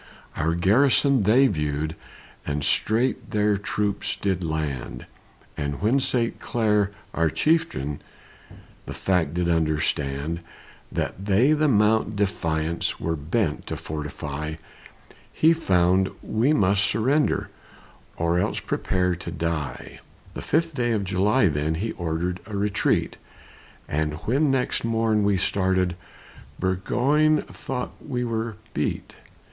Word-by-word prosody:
Our 80 +2 0
garrison, 130 +8 +4
they 115 +7 +5
viewed 75 - -1
them, - - -12 0.5
And 75 0 -1
straight 115 - +1
their 105 0 +2
troops 100 0 -2
did 95 -2 -1
land; 80 -5 -3 0.5
And 70 -1 -3
when 115 +7 +2
St. 120 -3 0
Clair, 105 -4 +1 0.2
our 80 -1 +2
chieftain, 150 - 0 0.9
The - - -6
fact 90 -5 0
did 90 -1 0
understand, 75 -1 0 0.5
That 95 - -3
they 105 +9 +4
the 155 0 +2
Mount 110 -2 +3
Defiance 85 -5 -1
Were 80 0 -1
bent 80 +3 -1
to - - -4
fortify, 75 0 -5 0.8
He 160 +1 +4
found 95 - +2
we 115 +7 +1
must 100 -8 +3
surrender, 130 +9 +1 0.7
Or 85 +1 +1
else - - 0
prepare 90 -1 0
to 85 0 -7
die. 80 -6 -4 0.3
The - - -6
fifth 165 +2 0
day 120 -3 0
of 105 -2 0
July, 100 +4 +2
then, 75 0 0
He 105 +7 -2
ordered 85 +1 -2
a 105 -2 -4
retreat; 100 0 0 0.7
And 75 0 -1
when 140 +6 +2
next 130 -2 0
morn 115 -2 +1
we 100 -1 +2
started, 95 -1 +1 0.6
Burgoyne 135 +12 +2
thought 125 -2 -5
we 125 -4 -2
were 115 -1 -2 0.2
beat. - - -3
95 Hz, 125 wpm, -24 LUFS, 80-115 Hz, 0.9 s, they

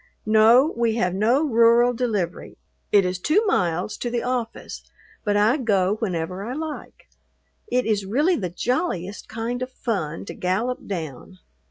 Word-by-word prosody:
No, 225 +7 +5
we 230 -1 +1
have 180 -6 0
no 230 +9 +2
rural 235 0 +4
delivery. 215 -8 -3 0.3
It 200 -2 +5
is 180 0 -2
two 370 - +2
miles 180 - 0
to 240 - -3
the 235 0 -2
office, 245 -2 -4 0.4
but 205 -2 +1
I 215 +7 +3
go 205 -6 +1
whenever 180 -3 -3
I 240 +4 -4
like. 310 +1 -7 0.6
It 250 -10 0
is 210 -3 0
really 290 - +2
the 185 - -3
jolliest 205 - -2
kind 230 +3 -4
of 255 - -3
fun 185 -12 -3
to - - -7
gallop 220 +8 -2
down. 165 -2 -6
220 Hz, 155 wpm, -23 LUFS, 185-245 Hz, 0.6 s, No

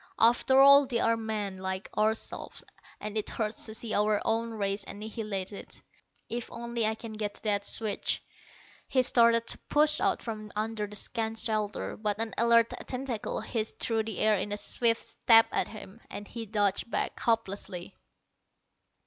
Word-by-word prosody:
After 245 +3 +4
all, 280 0 +8
they 245 -2 -1
are 230 0 +3
men, 215 -4 -3
like 190 +1 -4
ourselves, 220 +1 -1 0.4
and 210 0 -6
it 210 - -2
hurts 220 0 -2
to 220 - -5
see 225 -1 -3
our 210 0 +2
own 230 +1 0
race 200 -2 -2
annihilated. 210 -2 -5 0.5
If 240 0 -5
only 235 -1 -1
I 220 - 0
can 225 0 -9
get 210 -1 -4
to - - -7
that 205 -2 0
switch." 215 -2 -1 0.6
He 255 -1 +2
started 230 -1 +4
to - - -2
push 300 +1 +4
out 390 -1 +1
from 215 -2 -6
under 215 0 -2
the 210 - -6
scant 225 +1 -1
shelter, 215 -2 -1
but 210 -1 -2
an 225 0 -2
alert 235 0 +4
tentacle 255 -4 -3
hissed 220 -2 -3
through 225 -2 0
the 220 -3 -5
air 215 0 +4
in 205 - -3
a 205 - -1
swift 230 +2 +2
stab 225 -1 +5
at - - +1
him, 215 0 -11
and 205 - -7
he 230 -1 -7
dodged 205 0 0
back, - - -2
hopelessly. 200 -5 -2
220 Hz, 165 wpm, -29 LUFS, 210-230 Hz, 0.6 s, all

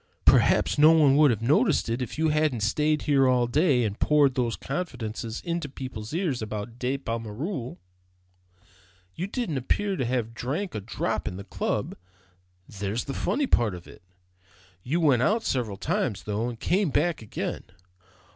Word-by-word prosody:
Perhaps - - +4
no 155 +2 +8
one 145 -4 +5
would 150 -1 +6
have 115 -2 -1
noticed 130 +1 +3
it 115 +3 -2
if 125 - -5
you 160 0 +2
hadn't 150 -6 +1
stayed 150 +8 +1
here 140 -3 +3
all 125 -1 +3
day, 135 0 +2
and 105 -2 -3
poured 145 -3 +4
those 120 -3 0
confidences 120 -8 -5
into 170 -4 -3
people's 125 -5 -7
ears 160 -7 -1
about 110 +2 -6
De 130 +2 -1
Pommereul. 115 - -4 1.4
You 180 - -4
didn't 205 - -2
appear 195 +10 0
to 130 - -1
have 115 -2 -1
drank 150 - -3
a 105 - -4
drop 105 - -3
in 90 - -4
the 100 - -7
club; 100 - -3 0.7
there's 100 +3 -3
the 135 - -5
funny 285 - 0
part 115 - +2
of 90 - -11
it. - - -14 0.8
You 145 - -1
went 140 -7 +3
out 220 - +2
several 115 -7 -2
times, 160 - -1
though, 105 +3 -2
and 115 -2 -8
came 190 - +1
back 160 +2 0
again. 110 - -5
130 Hz, 165 wpm, -26 LUFS, 115-155 Hz, 1.4 s, no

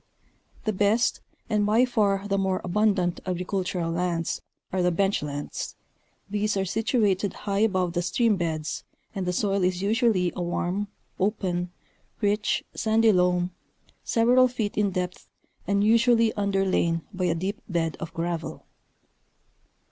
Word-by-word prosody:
The 215 - +1
best, 210 +4 +2 0.3
and 210 -2 +1
by 220 +4 +4
far 205 -5 +1
the 200 -1 +1
more 190 -1 +1
abundant 185 -2 +1
agricultural 180 -1 -2
lands, 170 -1 -1 0.3
are 185 - +1
the 180 - +3
"bench 195 +3 +1
lands," 145 -1 -5 0.5
these 205 0 0
are 195 - +1
situated 205 -2 +1
high 200 -1 0
above 185 -5 +2
the 175 - 0
stream 215 +5 +2
beds 160 -4 -3 0.3
and 190 -3 -3
the - - +2
soil 195 +1 0
is 180 +1 0
usually 210 -5 +2
a 180 - -3
warm 175 +3 -1 0.3
open, 185 -3 0 0.5
rich, 210 0 +1
sandy 220 0 +3
loam, 180 -1 +2 0.5
several 245 +2 +4
feet 230 -5 -3
in 210 -1 +2
depth 180 -1 -4 0.4
and 200 0 +2
usually 230 +1 +4
underlain 195 -5 +1
by 185 -1 -1
a 170 -2 +1
deep 195 +8 -3
bed 165 -3 0
of 165 0 -6
gravel. 165 0 -4
195 Hz, 140 wpm, -26 LUFS, 180-210 Hz, 0.5 s, by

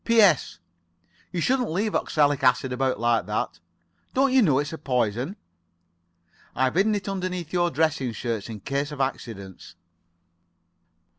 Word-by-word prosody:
"P.S.—You 85 - 0
shouldn't 250 +4 +1
leave 200 +6 -1
oxalic 145 -3 +1
acid 125 0 +3
about 130 -2 0
like 120 0 +1
that. - - -2 0.6
Don't 270 0 +3
you 260 - +6
know 150 - +4
it's 145 +3 -1
a 160 - -6
poison? 125 - -1 1.2
I've 130 0 +1
hidden 205 +5 +3
it 200 -1 -4
underneath 185 -3 -3
your 175 -1 +2
dress 155 -1 +1
shirts, 115 -3 -3
in 110 -3 -7
case 140 +6 -2
of 145 - -7
accidents." 110 -8 -5
145 Hz, 135 wpm, -25 LUFS, 120-185 Hz, 1.2 s, you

